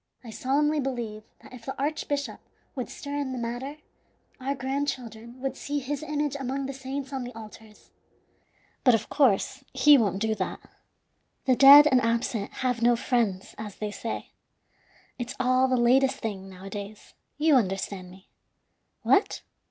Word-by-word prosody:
I 230 - -9
solemnly 295 +6 +1
believe 240 -6 -3 0.2
that - - -14
if 245 -2 -11
the 265 +2 -6
archbishop 285 0 -2 0.3
would 255 -3 -5
stir 285 0 -6
in 275 -2 -2
the - - -4
matter, 245 +5 -4 0.6
our 270 +2 -2
grandchildren 255 -4 -4
would 265 0 -3
see 290 +1 -4
his 285 +1 -3
image 295 -2 -2
among 270 +1 -3
the 275 - -4
saints 270 +1 -6
on 265 -2 -3
the 245 -1 -8
altars. 215 -1 -13 0.9
But, 250 -4 +6
of 220 -1 -3
course, 265 -1 +2
he 285 +1 +7
won't 200 -4 +1
do 220 +2 0
that. 195 -3 -3 0.9
The 260 - +4
dead 280 +3 +10
and 260 -4 +4
absent 230 -2 -1 0.2
have 250 -2 0
no 240 +1 +5
friends, 230 -6 -1
as 210 -3 -7
they 210 -1 -4
say. 225 +2 -5 0.9
It's 245 +2 -4
all 255 +1 +3
the 255 -1 +1
latest 260 +3 +4
thing, 195 -3 -5
nowadays; 200 +2 -9 0.2
you 305 +1 +3
understand 195 -5 0
me. 185 +2 -16 0.8
What? 395 - +2
255 Hz, 155 wpm, -27 LUFS, 220-275 Hz, 0.9 s, dead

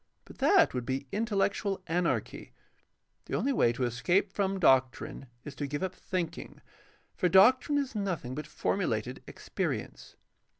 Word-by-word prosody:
But - - -15
that - - +4
would 125 -1 -2
be" 135 +3 -3
intel 215 -1 -1
lectual 200 -1 -3
anarchy. 170 +1 -2 0.7
The - - -4
only 275 - 0
way 120 - +3
to 125 - -3
escape 175 - +1
from 195 -1 -1
doctrine 130 -3 +2 0.2
is 145 - -8
to 145 - -3
give 145 +5 -3
up 185 -1 -2
thinking, 180 -3 -5 0.6
for 180 - +1
doctrine 255 - +5
is 280 -2 -2
nothing 185 - -3
but 150 +2 -6
formulated 125 - -2
experience. - - -5
175 Hz, 145 wpm, -30 LUFS, 130-200 Hz, 0.7 s, doctrine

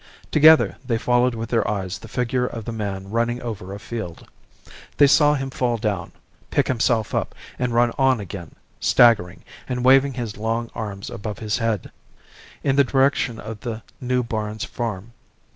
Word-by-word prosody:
Together 155 +1 +6
they 120 -3 0
followed 125 +1 +2
with 115 0 -5
their 115 -2 +1
eyes 95 -3 -3
the - - -11
figure 125 +1 -1
of 115 -3 -7
the 115 - -4
man 100 -3 -5
running 120 +1 0
over 100 -5 -6
a 100 - -6
field; 105 -6 -7 0.7
they 145 - +7
saw 145 +1 +5
him 135 -1 -4
fall 120 -2 0
down, 105 -3 -2 0.4
pick - - +1
himself 115 -3 +1
up, - - -2 0.2
and 125 -1 0
run 120 0 +4
on 135 -3 +4
again, 95 -4 -8 0.2
staggering 95 -7 +4 0.3
and 125 -1 -2
waving 135 0 +5
his 115 -5 -5
long 115 +2 -2
arms 100 -3 -6
above 105 -3 -5
his 105 0 -2
head, 115 -4 -1 0.7
in 135 - +2
the 140 - +7
direction 135 -3 +1
of 110 0 -7
the 115 -1 -5 0.2
New 125 0 0
Barns 110 -2 -3
Farm. 115 -1 -5
115 Hz, 170 wpm, -22 LUFS, 105-125 Hz, 0.7 s, they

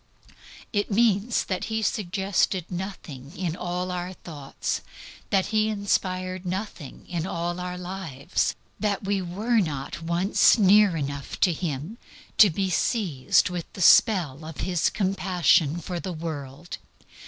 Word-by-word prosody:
It 205 -1 0
means 220 +1 +2
that 185 -2 -2
He 220 0 -2
suggested 190 -2 0
nothing 175 -5 -7
in 175 -3 -2
all 180 +1 -3
our 180 +1 -4
thoughts, 145 -6 -5 0.5
that 195 -2 +2
He 215 0 +3
inspired 185 -3 -1
nothing 185 -5 -6
in 175 -1 -3
all 175 0 -3
our 180 0 -4
lives, 180 -7 -2 0.2
that 205 -2 -1
we 195 0 0
were 210 +7 0
not 150 -5 -3
once 170 +8 +3
near 205 -3 +5
enough 140 -1 -5
to 180 - +4
Him, 160 - -4 0.4
to 210 - +9
be 190 +3 -1
seized 180 - +1
with 175 -2 -5
the 185 - -7
spell 165 -8 +5
of 155 -1 -7
His 180 -3 +1
compassion 180 -5 +2
for 175 +1 -4
the 185 +1 -5
world. 155 -1 -6
180 Hz, 135 wpm, -25 LUFS, 165-195 Hz, 0.5 s, to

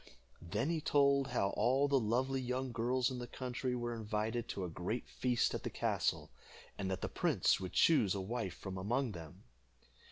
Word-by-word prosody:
Then 105 - -1
he 165 -2 -1
told 140 -2 +3
how 100 -7 0
all 130 +6 +3
the 140 -1 +3
lovely 130 +4 0
young 130 +1 -2
girls 125 +2 +1
in 125 - -4
the 120 - -5
country 125 0 -3
were 120 -1 -2
invited 110 +1 -2
to 95 - -4
a - - -3
great 90 +8 -3
feast 125 -2 +1
at - - -2
the - - -3
castle, - - -1 0.4
and 95 -2 -3
that 95 0 -2
the - - -1
prince - - +2
would 95 -1 -5
choose 110 - +4
a - - -2
wife 95 -2 -3
from 95 -1 -6
among 120 +6 0
them. 85 -5 -10
120 Hz, 190 wpm, -35 LUFS, 100-130 Hz, 0.4 s, choose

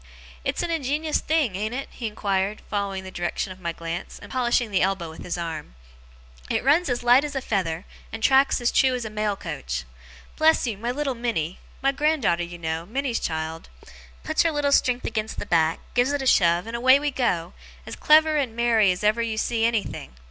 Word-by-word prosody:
'It's - - -1
an 345 - -2
ingenious 305 0 0
thing, 300 - 0
ain't 215 +5 -2
it?' 275 - -4
he 235 - -5
inquired, 200 -1 -1
following 200 -2 -2
the 190 - -8
direction 175 +2 -3
of 185 - -10
my 170 -2 -3
glance, 165 +1 -6
and - - -12
polishing 240 -2 +1
the 190 - +2
elbow 185 -3 0
with 160 - -11
his 180 - -3
arm. 160 - -5 0.7
'It - - 0
runs 300 +5 +3
as 245 -1 -1
light 245 +3 +6
as 295 -1 -5
a - - +1
feather, 185 -8 -2 0.3
and 225 0 -7
tracks 270 0 +4
as 240 0 +1
true 260 -1 +3
as 245 -2 -4
a 215 - -5
mail 210 -1 -1
coach. 65 - -5 0.5
Bless 320 -1 +4
you, 230 -4 -2
my 230 +5 -4
little 275 +1 -1
Minnie 220 -9 -2 0.2
my 275 - +4
grand 300 0 0
daughter 170 -3 +2
you 175 0 -7
know, 160 0 -3
Minnie's 255 +2 -1
child 160 0 -4 0.5
puts 315 0 +1
her 330 - +2
little 290 -2 0
strength 250 -2 +2
against 220 -1 -3
the - - -4
back, 165 -1 +2
gives 245 +3 +2
it 290 - -1
a - - -4
shove, 175 -6 +4
and 230 +1 -5
away 260 +3 +5
we 295 0 -1
go, 180 -10 -1 0.3
as - - -7
clever 310 0 +5
and 255 -6 -1
merry 230 -4 +3
as 180 +3 -4
ever 215 +3 +3
you 225 -1 -2
see 225 +1 0
anything! 225 - -2
225 Hz, 215 wpm, -24 LUFS, 180-265 Hz, 0.7 s, light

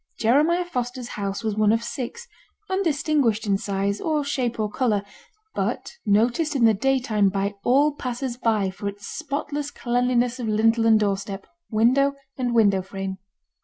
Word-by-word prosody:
Jeremiah 305 +10 +3
Foster's 250 -5 -4
house 200 +1 -4
was 215 -2 -1
one 215 -1 +3
of 225 +1 +1
six, 275 - -5 0.4
undistinguished 300 - +1
in 200 -2 +1
size, 200 0 -1
or 305 -2 0
shape, 255 -5 -2
or 215 - +1
colour; 210 -2 0 0.5
but - - -2
noticed 240 +9 +2
in 245 -4 +4
the 225 - +6
daytime 225 -3 +2
by 200 +1 -1
all 280 +4 +4
passers 250 -2 -4
by 220 -6 +1
for 200 +2 -6
its 200 +1 -6
spotless 290 -1 -4
cleanliness 245 -1 0
of 235 - -3
lintel 225 +2 +3
and 220 -1 +6
doorstep, 195 -1 -2 0.2
window 260 +6 +3 0.2
and 245 -2 -1
window 200 -4 +4
frame. 190 0 -6
235 Hz, 155 wpm, -24 LUFS, 205-270 Hz, 0.5 s, the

